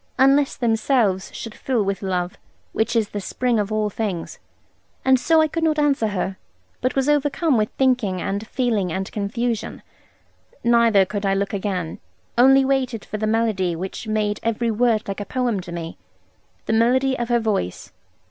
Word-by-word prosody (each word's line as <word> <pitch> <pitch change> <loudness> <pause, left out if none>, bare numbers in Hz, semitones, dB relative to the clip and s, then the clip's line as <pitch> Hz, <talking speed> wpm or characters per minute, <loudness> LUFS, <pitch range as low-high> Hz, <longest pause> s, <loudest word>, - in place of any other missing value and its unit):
Unless 275 +2 +4
themselves 225 -4 +1
should 225 - -7
fill 245 -4 -1
with 195 -1 -2
love, 180 -2 -2 0.4
which 220 - 0
is 220 -3 +2
the 205 - -4
spring 245 +3 0
of 205 0 -2
all 215 -1 0
things. 195 -5 -4 0.7
And 265 -1 +5
so 320 +4 +4
I 315 - +3
could 325 +2 -3
not 310 -1 +2
answer 285 -6 +2
her, 195 -2 -3 0.4
but 255 - 0
was 270 0 +1
overcome 295 +1 +2
with 215 -2 +1
thinking 250 -8 +2
and 200 +4 -3
feeling 230 -8 0
and 190 +2 -3
confusion. 225 +2 -3 0.8
Neither 230 -4 +4
could 205 +1 -4
I 195 -1 +2
look 200 +1 -1
again; 190 -5 -3 0.4
only 270 +2 +6
waited 255 -5 -1
for 215 - -5
the 215 - 0
melody 215 -6 +1
which 190 +6 -6
made 215 -1 0
every 230 +1 0
word 225 -1 +1
like 195 0 -4
a - - -2
poem 245 -4 -1
to 175 -1 -8
me, 170 -1 -6 0.7
the - - -1
melody 260 +4 +3
of 240 0 -2
her 240 0 +3
voice. 210 - -2
220 Hz, 175 wpm, -22 LUFS, 200-255 Hz, 0.8 s, only